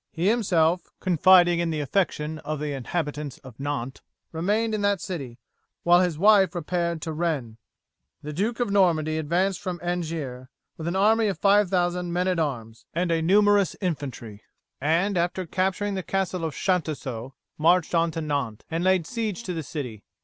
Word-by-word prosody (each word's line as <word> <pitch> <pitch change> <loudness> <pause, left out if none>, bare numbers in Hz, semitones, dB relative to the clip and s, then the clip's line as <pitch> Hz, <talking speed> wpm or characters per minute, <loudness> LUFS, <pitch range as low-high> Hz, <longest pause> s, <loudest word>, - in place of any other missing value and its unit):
He 175 +4 +1
himself, 180 -7 +2
confiding 175 0 +5
in 170 -1 0
the 155 -1 -2
affection 155 0 -1
of 155 0 -4
the 150 -1 -3
inhabitants 145 +1 -4
of 130 -3 -13
Nantes, 135 -2 -4 0.3
remained 210 +7 0
in 215 - -1
that 200 -1 +2
city, 140 -11 -6 0.5
while 175 +1 +6
his 175 -4 0
wife 195 -1 +5
repaired 170 -1 -2
to 160 - -3
Rennes. 150 -9 -2 0.7
"The 150 +1 -5
Duke 215 +9 -1
of 240 -4 0
Normandy 160 -5 +2
advanced 175 +4 0
from 180 -2 -4
Angiers 160 -8 -3 0.3
with 160 - -6
an 170 - -1
army 220 +3 +4
of 195 -5 -1
5000 180 -3 +2
men 180 +2 0
at 180 -2 +1
arms 115 -7 -4
and 170 0 0
a 165 -1 +1
numerous 205 +3 +4
infantry, 135 - -4 0.4
and 170 +6 +1
after 180 +2 -1
capturing 190 +4 -1
the 190 - -2
castle 185 -1 -2
of 155 -4 -4
Chantoceaux 140 - -2 0.2
marched 170 +2 +3
to 165 -1 +1
Nantes 140 -8 -3
and 165 +2 -1
laid 185 -3 +3
siege 225 +1 -3
to 185 - -4
the 165 - -3
city. 125 -8 -6
170 Hz, 165 wpm, -25 LUFS, 150-190 Hz, 0.7 s, while